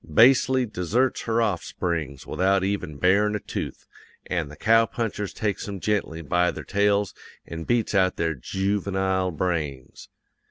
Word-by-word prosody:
Basely 130 +1 +5
deserts 115 +6 0
her 115 0 +2
offsprings 85 -8 -2
without 95 0 +1
even 95 -7 -2
barin' 100 +5 +3
a - - -1
tooth, - - -6 0.4
an' 85 -4 -2
the 75 - -11
cow 115 +4 +4
punchers 105 -4 -3
takes 105 -1 -2
'em 100 -1 -5
gently 90 -5 -1
by 90 +4 +2
their - - -5
tails 100 -2 +1 0.3
an' 80 -1 -7
beats 120 -3 +1
out 95 -2 +3
their 80 -1 0
joovenile 95 +4 -1
brains. 75 -7 -3
95 Hz, 145 wpm, -25 LUFS, 85-105 Hz, 0.4 s, Basely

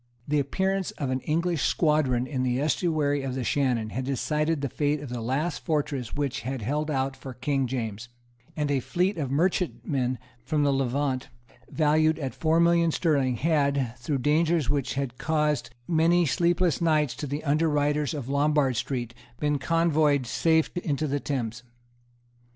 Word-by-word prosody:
The 150 0 +2
appearance 190 +7 0
of 135 -3 -2
an 130 - 0
English 165 +3 0
squadron 150 -6 +2
in 130 -1 -3
the 125 0 0
estuary 150 -1 +1
of 135 -1 -3
the 130 - -2
Shannon 120 -5 0
had 130 - -3
decided 145 +4 0
the 140 - 0
fate 145 +3 0
of 145 -3 -8
the 120 -1 -4
last 140 +7 -2
fortress 145 -6 -2
which 140 -3 -2
had 130 0 -4
held 150 +6 -1
out 135 -2 -1
for 130 -2 -9
King 135 +1 0
James; 115 -2 -4 0.5
and 150 -1 0
a 140 - +2
fleet 180 +7 0
of 140 -4 -2
merchantmen 140 -5 0 0.3
from 145 +4 0
the 140 - +3
Levant, 135 0 -1 0.4
valued 155 0 +2
at 135 -5 -4
four 160 +1 +2
millions 170 -1 +3
sterling, 140 -7 +1
had, 140 -3 +1
through 140 +4 -1
dangers 155 +1 +2
which 135 -3 -1
had 135 -3 -3
caused 150 -5 0 0.2
many 170 +1 +3
sleepless 170 +3 +1
nights 155 -5 +2
to 145 - -4
the 145 +3 -4
underwriters 150 -1 +1
of 140 -5 -5
Lombard 140 -2 +2
Street, 120 -3 -3 0.3
been 150 -1 0
convoyed 155 -3 +2
safe 160 +7 +1
into 155 -3 -1
the 145 -1 -1
Thames. 125 -4 -3
145 Hz, 160 wpm, -26 LUFS, 130-155 Hz, 0.5 s, the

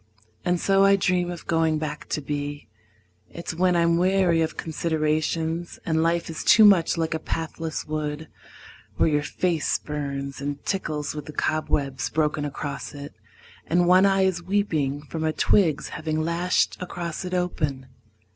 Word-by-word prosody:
And 180 -1 +1
so 195 +1 +3
I 195 0 +6
dream 180 -2 +1
of 175 -1 -7
going 160 -1 +2
back 150 -1 -5
to 150 - -1
be. 145 0 -4 0.6
It's 170 0 -6
when 180 +2 +2
I'm 170 0 +3
weary 180 -2 +3
of 160 - -2
considerations, 160 +1 -1
And 160 -1 +1
life 165 +1 +1
is 165 - -5
too 215 0 +7
much 180 -5 +5
like 165 0 0
a 160 - -2
pathless 160 0 -4
wood 155 0 -4 0.7
Where - - +4
your 150 -1 +2
face 165 +1 0
burns 140 -2 -5
and 145 0 -4
tickles 155 -6 -2
with 150 -2 -6
the 150 - -8
cobwebs 140 -5 -1
Broken 150 -1 0
across 145 0 -5
it, 145 0 -8 0.5
and 175 +1 +3
one 185 +2 +6
eye 195 -1 +3
is 185 -2 +1
weeping 160 -7 -1
From 160 +2 -5
a 160 - +1
twig's 155 -3 +2
having 155 0 -2
lashed 170 +2 +1
across 175 -1 -5
it 185 0 -3
open. 150 -7 -1
160 Hz, 160 wpm, -25 LUFS, 150-175 Hz, 0.7 s, too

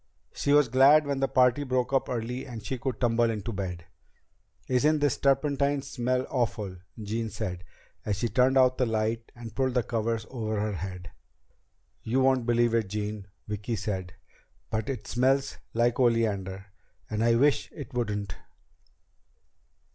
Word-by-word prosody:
She 140 - -1
was 145 -2 +6
glad 135 +5 +6
when 140 -1 -1
the 135 - +2
party 130 +2 +3
broke 130 -1 -1
up 135 - +1
early 125 +2 -3
and 115 -4 -8
she 130 +2 -3
could 130 -3 -3
tumble 120 -1 +2
into 110 +1 -3
bed. 90 -4 -5 0.8
"Isn't 145 +5 +3
this 145 -3 +1
turpentine 140 0 +2
smell 125 0 -1
awful?" 110 -6 -1 0.2
Jean 110 +2 -3
said 95 -4 -5 0.4
as 105 - -1
she 120 - 0
turned 130 +3 +3
out 130 -1 +4
the 125 - +2
light 110 +1 -1
and 115 -3 -9
pulled 130 +1 0
the 125 - +3
covers 115 -1 -2
up - - -19
over 110 -4 -2
her 105 0 -1
head. 90 -1 -6 0.9
"You 120 +4 0
won't 130 -2 +3
believe 120 -1 +3
it, 115 -3 +1
Jean," 105 0 -4 0.2
Vicki 105 +2 -3
said, 95 -3 -4 0.6
"but 110 +2 -2
it 125 -6 -4
smells 135 +3 +1 0.2
like 120 +2 +2
oleander. 100 -5 0 0.4
And 110 +1 -1
I 115 0 +4
wish 140 +4 +2
it 140 -2 -9
wouldn't." 105 -5 -2
115 Hz, 160 wpm, -28 LUFS, 105-130 Hz, 0.9 s, was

